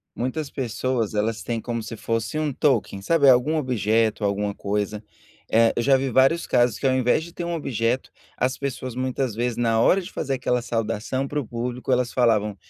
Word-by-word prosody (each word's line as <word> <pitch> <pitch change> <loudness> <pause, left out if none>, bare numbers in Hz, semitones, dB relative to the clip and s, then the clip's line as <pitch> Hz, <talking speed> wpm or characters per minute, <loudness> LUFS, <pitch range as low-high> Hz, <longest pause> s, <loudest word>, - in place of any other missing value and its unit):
Muitas 135 +5 -3
pessoas 120 -3 -2
elas 110 +1 -1
têm 115 -1 -3
como 115 0 -3
se 115 0 -7
fosse 115 +5 -2
um 150 -2 -1
token, 130 -8 +1
sabe 145 +6 +3
algum 130 +4 +5
objeto, 115 -6 +1
alguma 100 0 0
coisa, 105 +1 -3 0.5
eh, 115 0 +4
eu 120 - +1
já 135 +1 +4
vi 135 0 -1
vários 135 +7 +3
casos 120 -2 +2
que - - -5
ao 130 - +4
invés 130 +4 +2
de 170 0 -11
ter 175 - -5
um 170 0 -2
objeto, 125 -4 -1 0.3
as 130 +1 0
pessoas 130 -2 -4
muitas 130 -1 -2
vezes 120 +1 -2
na 115 -2 +2
hora 195 - +4
de 185 +1 -8
fazer 135 -2 -2
aquela 125 -1 0
saudação 115 +3 -2
para 150 +2 -2
o 130 - -5
público 125 +2 -4
elas 125 -1 +1
falavam: 110 -4 +2
125 Hz, 200 wpm, -24 LUFS, 115-135 Hz, 0.5 s, algum